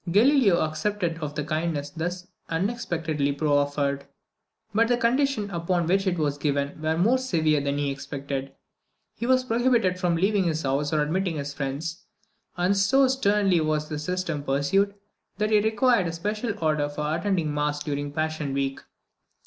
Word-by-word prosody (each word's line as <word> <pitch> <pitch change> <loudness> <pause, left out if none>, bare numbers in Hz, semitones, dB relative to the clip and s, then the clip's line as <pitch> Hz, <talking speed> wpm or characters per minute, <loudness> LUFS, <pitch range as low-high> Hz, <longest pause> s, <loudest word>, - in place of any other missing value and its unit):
Galileo 220 - +5
accepted 165 +2 -1
of 150 -2 -5
the 150 - -1
kindness 155 -1 -2
thus 175 +3 -4 0.2
unexpectedly 165 -6 -1
proffered. 145 -1 0 0.7
But 230 +2 +3
the 245 0 +2
conditions 245 -3 +1
upon 170 0 0
which 195 +3 +1
it 180 -1 +1
was 145 -2 -1
given 145 0 -1
were 160 +1 0
more 230 +9 +3
severe 160 - +1
than 140 0 -1
he 145 -1 0
expected. 135 0 -5 0.6
He 235 - -4
was 255 0 +4
prohibited 230 -6 +2
from 175 -2 +1
leaving 195 +2 +2
his 160 -2 -1
house 140 +2 0
or 155 -1 +2
admitting 175 +3 -1
his 140 -1 -4
friends; 145 +5 -4 0.5
and 180 +3 +2
so 265 +8 +4
sternly 205 -8 +2
was 155 -1 -1
this 150 -1 -4
system 180 -3 -2
pursued, 165 +9 +1 0.4
that 210 +1 0
he 210 - +6
required 220 -1 +2
a 165 - -3
special 210 +5 -2
order 150 -2 +1
for 150 +1 -2
attending 170 -4 0
mass 150 0 -1
during 145 -1 -3
passion 155 -2 -2
week. 135 0 -1
165 Hz, 160 wpm, -26 LUFS, 145-200 Hz, 0.7 s, he